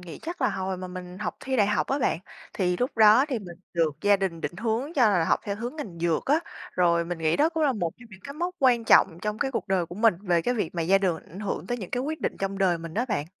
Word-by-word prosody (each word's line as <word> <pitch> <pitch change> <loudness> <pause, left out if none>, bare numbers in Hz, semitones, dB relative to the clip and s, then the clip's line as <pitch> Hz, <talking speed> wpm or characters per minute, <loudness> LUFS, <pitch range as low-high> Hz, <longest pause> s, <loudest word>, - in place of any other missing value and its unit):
nghĩ 175 -3 -9
chắc 340 -2 -5
là 255 - +4
hồi 190 -1 -3
mà 185 0 -6
mình 180 0 -8
học 210 - -4
thi 265 -1 -2
đại 205 - +4
học 210 0 +1
á 275 - 0
bạn, 230 - +1 0.3
thì 180 -2 0
lúc 250 +6 -2
đó 220 +4 +7
thì 255 -5 -1
mình 175 -4 -10 0.2
được 165 -3 +2
gia 205 0 +4
đình 190 -4 -3
định 175 - -4
hướng 230 - -2
cho 245 -6 +5
là 180 -5 +2
học - - +2
theo 200 -1 -3
hướng 240 +7 -5
ngành 195 - -7
dược 165 -2 0
á. 295 +4 +3 0.3
Rồi 170 -1 +3
mình 175 0 -4
nghĩ 160 0 +1
đó 305 +3 +4
cũng 325 -1 -2
là 285 -3 +3
một 175 -7 -2
trong 240 - -15
những 190 -1 -13
cái 280 0 -7
mốc 350 +3 -3
quan 245 -6 +3
trọng 170 -6 +5
trong 210 0 -2
cái 270 - 0
cuộc 235 - -3
đời 185 -3 +1
của 175 - -9
mình 215 0 +4
về 175 -4 +2
cái 245 - 0
việc 210 -8 -2
mà 170 - -1
gia 195 +4 +4
đường 180 -4 +1
ảnh 185 - -9
hưởng 200 -3 -3
tới 245 - -2
những 190 -5 -7
cái 250 +1 -1
quyết 315 +3 -4
định - - -2
trong 195 0 -3
đời 185 -3 +2
mình 165 -1 -8
á 230 +4 +1
bạn. 150 -9 -1
200 Hz, 300 wpm, -26 LUFS, 175-245 Hz, 0.3 s, đó